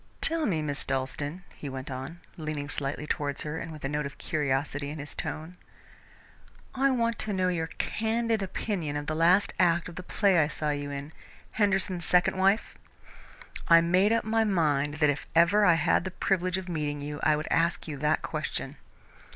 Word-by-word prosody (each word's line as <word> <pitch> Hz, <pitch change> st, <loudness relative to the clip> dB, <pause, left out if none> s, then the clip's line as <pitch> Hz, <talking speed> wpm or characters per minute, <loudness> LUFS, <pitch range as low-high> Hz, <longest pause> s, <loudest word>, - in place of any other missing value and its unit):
"Tell 325 Hz, -2 st, +4 dB
me, 160 Hz, -7 st, 0 dB
Miss 145 Hz, -1 st, -2 dB
Dalstan," 145 Hz, +6 st, -3 dB
he 145 Hz, -, -7 dB
went 130 Hz, +1 st, -6 dB
on, 135 Hz, +7 st, -6 dB
leaning 155 Hz, -3 st, -4 dB
slightly 145 Hz, +1 st, -3 dB
towards 145 Hz, -2 st, -2 dB
her, 150 Hz, +2 st, -4 dB
and 165 Hz, -, -6 dB
with 155 Hz, -3 st, -8 dB
a -, -, +1 dB
note 145 Hz, 0 st, -2 dB
of 140 Hz, -, -12 dB
curiosity 145 Hz, -1 st, -1 dB
in 150 Hz, -, -6 dB
his 145 Hz, 0 st, -6 dB
tone, 160 Hz, +3 st, -5 dB, 1.2 s
"I 270 Hz, +1 st, +2 dB
want 235 Hz, -3 st, 0 dB
to 215 Hz, -1 st, -1 dB
know 185 Hz, -1 st, +1 dB
your 165 Hz, -2 st, -1 dB
candid 225 Hz, +3 st, -1 dB
opinion 185 Hz, -5 st, -3 dB
of 145 Hz, -, -4 dB
the 155 Hz, -, -2 dB
last 170 Hz, +5 st, +3 dB
act 170 Hz, -2 st, +3 dB
of 170 Hz, -, -10 dB
the -, -, -4 dB
play 190 Hz, 0 st, +2 dB
I 150 Hz, -, +4 dB
saw 150 Hz, 0 st, -2 dB
you 145 Hz, 0 st, -3 dB
in 140 Hz, +2 st, -6 dB, 0.4 s
'Henderson's 190 Hz, -4 st, +1 dB
Second 180 Hz, +1 st, +4 dB
Wife'? 195 Hz, +3 st, +1 dB, 0.9 s
I 170 Hz, 0 st, +8 dB
made 185 Hz, +5 st, +3 dB
up 230 Hz, -, +2 dB
my 225 Hz, +1 st, +2 dB
mind 150 Hz, -8 st, +1 dB
that 150 Hz, -1 st, +3 dB
if 145 Hz, -, -6 dB
ever 180 Hz, +6 st, +5 dB
I 170 Hz, -3 st, +6 dB
had 160 Hz, +1 st, +2 dB
the 190 Hz, -, -3 dB
privilege 185 Hz, 0 st, 0 dB
of 190 Hz, -1 st, -6 dB
meeting 150 Hz, -4 st, -2 dB
you, 145 Hz, +1 st, -5 dB
I 155 Hz, -, +4 dB
would 150 Hz, +1 st, -4 dB
ask 170 Hz, +1 st, +1 dB
you 155 Hz, -, -4 dB
that 150 Hz, +2 st, +1 dB
question." -, -, -4 dB
165 Hz, 190 wpm, -28 LUFS, 145-190 Hz, 1.2 s, I